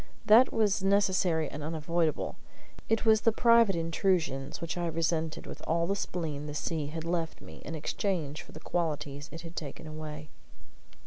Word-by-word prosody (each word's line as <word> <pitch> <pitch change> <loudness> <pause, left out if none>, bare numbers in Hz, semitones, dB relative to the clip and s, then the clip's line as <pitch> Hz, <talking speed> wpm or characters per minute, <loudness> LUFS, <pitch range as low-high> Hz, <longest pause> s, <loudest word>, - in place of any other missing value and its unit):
That 230 +5 +7
was 210 -2 +2
necessary 190 -5 +2
and 145 - -7
unavoidable; 160 +1 -1 0.5
it 225 +1 +1
was 220 -1 +5
the 230 - +4
private 230 -3 +5
intrusions 165 -5 0
which 170 - -4
I 175 -1 -1
resented 165 -1 -1
with - - -8
all 170 +1 +2
the 195 +3 0
spleen 155 -6 -3
the 150 - -5
sea 155 -1 -2
had 160 +2 -5
left 165 -1 -2
me - - -12
in 160 - -5
exchange 160 -2 -2
for - - -14
the 155 - -10
qualities 150 -4 -2
it 165 +2 -7
had 165 0 -10
taken 145 0 -6
away. 155 -1 -7
165 Hz, 170 wpm, -30 LUFS, 155-190 Hz, 0.5 s, That